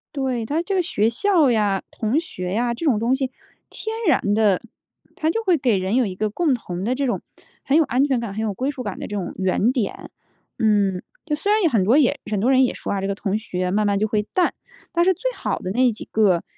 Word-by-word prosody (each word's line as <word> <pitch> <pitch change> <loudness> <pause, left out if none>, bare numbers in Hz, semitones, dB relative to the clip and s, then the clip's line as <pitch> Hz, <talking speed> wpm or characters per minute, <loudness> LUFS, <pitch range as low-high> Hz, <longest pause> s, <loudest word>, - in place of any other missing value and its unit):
对， 260 -4 -1
它 300 +8 0
这 385 +3 -2
个 370 - +3
学 225 -11 +1
校 325 - +3
呀， 210 -4 +1
同 230 +7 0
学 185 - -5
呀， 240 +3 +1
这 290 - -5
种 250 -8 +3
东 235 +4 +2
西， 265 -1 -2 0.4
天 440 0 -5
然 320 - +4
地， 210 -4 +3 0.5
它 315 +1 0
就 455 - -2
会 365 -5 +3
给 250 -6 +2
人 190 +5 -1
有 255 - +3
一 195 - -4
个， 215 +3 -1
共 295 +5 +1
同 180 -6 -4
的 235 +5 0
这 275 +1 -1
种 240 - -1 0.5
很 275 - +2
有 325 - +6
安 260 +2 +2
全 265 -4 +1
感、 230 -4 -4
很 215 - -4
有 210 -2 -1
归 260 +8 -2
属 275 -3 -5
感 205 -4 -5
的 - - -5
这 205 - -5
种 180 - -4
原 190 +5 +2
点。 245 -6 -3 0.5
嗯， 200 -4 +2 0.2
就 300 -2 0
虽 360 +7 -1
然 430 0 +3
有 335 - +4
很 220 -8 +2
多 230 +9 +4
也 285 -1 +3
很 205 - 0
多 240 +7 +2
人 260 0 +5
也 250 - 0
说 - - -4
啊， 195 - -1
这 195 - -2
个 200 - -1
同 195 0 -2
学 180 -4 -3
慢 210 +2 +1
慢 200 0 +2
就 215 +2 +1
会 215 -1 +1
淡， 365 -2 +2 0.4
但 345 - +2
是 375 +1 +3
最 - - -2
好 - - -2
的 185 - -4
那 250 +3 +3
几 220 - -8
个， 195 -6 +3
235 Hz, 275 characters per minute, -22 LUFS, 205-290 Hz, 0.5 s, 有